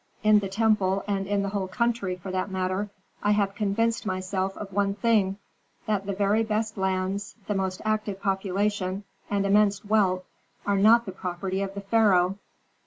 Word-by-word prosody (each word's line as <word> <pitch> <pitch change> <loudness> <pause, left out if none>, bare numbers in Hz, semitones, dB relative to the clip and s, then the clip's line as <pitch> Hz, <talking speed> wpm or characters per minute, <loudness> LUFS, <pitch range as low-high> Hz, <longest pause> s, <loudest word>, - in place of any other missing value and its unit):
In 215 0 +6
the 195 -2 -4
temple, 195 -2 +2
and 195 -1 -1
in 200 0 +1
the 200 - -1
whole 195 -1 -2
country, 225 -2 0
for 180 +1 -7
that 185 +2 -1
matter, 190 +2 -1 0.3
I 205 - +3
have 200 -1 +1
convinced 225 +3 0
myself 190 0 -2
of 195 -2 -7
one 200 0 +1
thing, 210 -4 +2 0.5
that 200 -2 -1
the 200 - -1
very 200 +3 +2
best 220 0 -1
lands, 190 0 -2
the 210 - -1
most 190 -1 -2
active 215 -2 -1
population, 195 0 -1 0.3
and 200 -1 0
immense 200 0 +3
wealth 195 -3 +2 0.4
are 200 -1 +2
not 230 +3 +6
the 190 - -5
property 185 +1 -3
of 195 0 -4
the 200 - -4
pharaoh." 195 -3 +3
200 Hz, 175 wpm, -26 LUFS, 190-210 Hz, 0.5 s, In